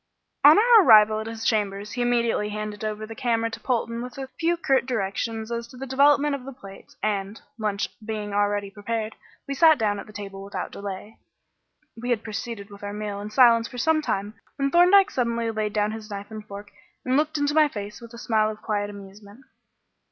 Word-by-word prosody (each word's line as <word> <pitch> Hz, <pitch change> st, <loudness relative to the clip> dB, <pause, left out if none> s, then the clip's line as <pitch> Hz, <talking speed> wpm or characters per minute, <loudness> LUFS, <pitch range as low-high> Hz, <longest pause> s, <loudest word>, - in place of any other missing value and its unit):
On 295 Hz, +2 st, +9 dB
our 460 Hz, +1 st, +7 dB
arrival 215 Hz, -3 st, +7 dB
at 220 Hz, -, -5 dB
his 225 Hz, 0 st, -6 dB
chambers 205 Hz, -1 st, -1 dB
he 245 Hz, -, -3 dB
immediately 235 Hz, -3 st, +1 dB
handed 210 Hz, 0 st, -5 dB
over 215 Hz, 0 st, -3 dB
the 225 Hz, -, -8 dB
camera 230 Hz, -1 st, -1 dB
to -, -, -7 dB
Polton 235 Hz, -2 st, -2 dB
with 250 Hz, +1 st, -8 dB
a 265 Hz, -1 st, -6 dB
few 340 Hz, +1 st, +1 dB
curt 270 Hz, -6 st, +1 dB
directions 225 Hz, 0 st, -3 dB
as 235 Hz, 0 st, -3 dB
to 250 Hz, -, -14 dB
the 270 Hz, -, -6 dB
development 285 Hz, +2 st, +3 dB
of 275 Hz, -2 st, -4 dB
the 270 Hz, -, -8 dB
plates, 195 Hz, -6 st, -14 dB
and, 205 Hz, 0 st, -2 dB, 0.2 s
lunch 205 Hz, -2 st, -1 dB, 0.2 s
being 210 Hz, -2 st, -4 dB
already 205 Hz, -1 st, 0 dB
prepared, 215 Hz, +2 st, -4 dB, 0.3 s
we 280 Hz, -, -2 dB
sat 315 Hz, +2 st, +6 dB
down 205 Hz, -3 st, 0 dB
at -, -, -9 dB
the -, -, -12 dB
table 195 Hz, -1 st, -8 dB
without 195 Hz, -2 st, -5 dB
delay. 200 Hz, +2 st, -8 dB, 0.8 s
We 240 Hz, +2 st, -6 dB
had 235 Hz, -3 st, 0 dB
proceeded 215 Hz, -1 st, -6 dB
with 200 Hz, -, -12 dB
our 205 Hz, 0 st, -5 dB
meal 205 Hz, -1 st, -5 dB
in 210 Hz, -, -6 dB
silence 230 Hz, 0 st, +5 dB
for 245 Hz, -, -10 dB
some 310 Hz, +5 st, +2 dB
time 205 Hz, -7 st, -2 dB, 0.2 s
when 275 Hz, -1 st, -1 dB
Thorndyke 380 Hz, +4 st, +6 dB
suddenly 235 Hz, -2 st, -1 dB
laid 215 Hz, -1 st, -2 dB
down 210 Hz, 0 st, +1 dB
his 220 Hz, 0 st, -8 dB
knife 205 Hz, +1 st, -7 dB
and 215 Hz, -1 st, -7 dB
fork 205 Hz, 0 st, -9 dB, 0.3 s
and 255 Hz, 0 st, +1 dB
looked 305 Hz, +2 st, +1 dB
into 290 Hz, 0 st, 0 dB
my 310 Hz, -1 st, +5 dB
face 210 Hz, -5 st, -7 dB
with 235 Hz, 0 st, -11 dB
a -, -, -10 dB
smile 220 Hz, -2 st, +1 dB
of 215 Hz, 0 st, -8 dB
quiet 205 Hz, -1 st, -1 dB
amusement. 200 Hz, +3 st, -12 dB
220 Hz, 210 wpm, -25 LUFS, 205-250 Hz, 0.8 s, On